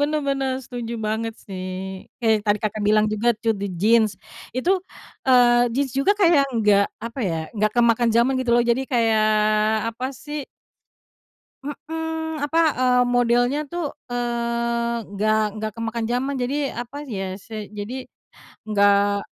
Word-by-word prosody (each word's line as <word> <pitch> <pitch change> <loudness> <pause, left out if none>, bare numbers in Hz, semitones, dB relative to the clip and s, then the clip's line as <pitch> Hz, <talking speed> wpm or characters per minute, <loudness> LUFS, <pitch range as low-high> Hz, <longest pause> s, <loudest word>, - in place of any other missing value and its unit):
bener 300 +1 +1
bener, 270 -1 0
setuju 235 -1 -6
banget 225 +1 -2
sih. 185 -3 -6 0.5
Kayak 220 -2 +3
tadi, 205 0 +3
Kakak, 215 0 -2
bilang 215 0 +4
juga 215 +3 0
tuh 225 - +2
di 200 - -1
jeans. 220 0 +4 0.4
Itu, 255 +8 +1 0.6
eee, 245 -1 +5
jeans 275 +1 0
juga 330 +9 +4
kayak 335 -6 +5
enggak, 210 -3 +4 0.2
apa 230 +3 -6
ya 165 - -1 0.2
enggak 215 0 +1
kemakan 235 0 +4
jaman 235 +3 +4
gitu 250 -2 -1
loh, 240 - +4
jadi 245 +3 +2
kayak, 225 -4 +2 0.6
apa 240 +3 -4 0.2
sih 295 0 -5 1.3
mhm, 320 +2 -4
apa, 320 +3 0 0.2
eee, 250 -1 +4
modelnya 245 +3 +3
tuh, 335 -1 -3 0.2
eee, 235 -1 -1
nggak 215 +2 +1 0.2
nggak 215 0 -3
kemakan 230 0 -3
jaman, 250 +4 -1
jadi 250 +2 -1 0.3
apa 285 +5 -9
ya 195 -8 -4
sih 210 +2 -8
jadi 250 +6 -5 0.6
enggak 200 -1 +3
235 Hz, 145 wpm, -23 LUFS, 215-260 Hz, 1.3 s, eee